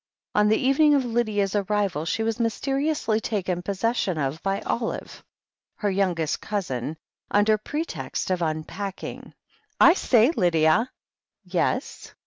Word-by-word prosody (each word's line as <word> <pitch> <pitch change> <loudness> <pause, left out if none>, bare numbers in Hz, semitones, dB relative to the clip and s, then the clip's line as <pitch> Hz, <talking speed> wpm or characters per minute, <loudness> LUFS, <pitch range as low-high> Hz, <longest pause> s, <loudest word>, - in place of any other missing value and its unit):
On 210 0 +4
the 220 - +4
evening 290 +3 +4
of 270 -3 +1
Lydia's 215 -4 0
arrival 200 -6 0
she 220 +7 -1
was 225 +1 -1
mysteri 270 +5 0
ously 230 -8 0
taken 190 -6 -2
possession 200 -1 -1
of 145 +2 -2
by 195 +1 -1
Olive, 230 -1 -4 0.5
her 205 -2 -1
youngest 180 -5 0
cousin, 160 - -3 0.3
imder 210 +1 +3
pretext 190 - -3
of 180 -1 0
unpacking. 165 +5 -5 0.4
"I 335 - +8
say, 245 - +4
Lydia." 175 - +3 0.5
"Yes?" - - -2
205 Hz, 125 wpm, -25 LUFS, 175-230 Hz, 0.5 s, I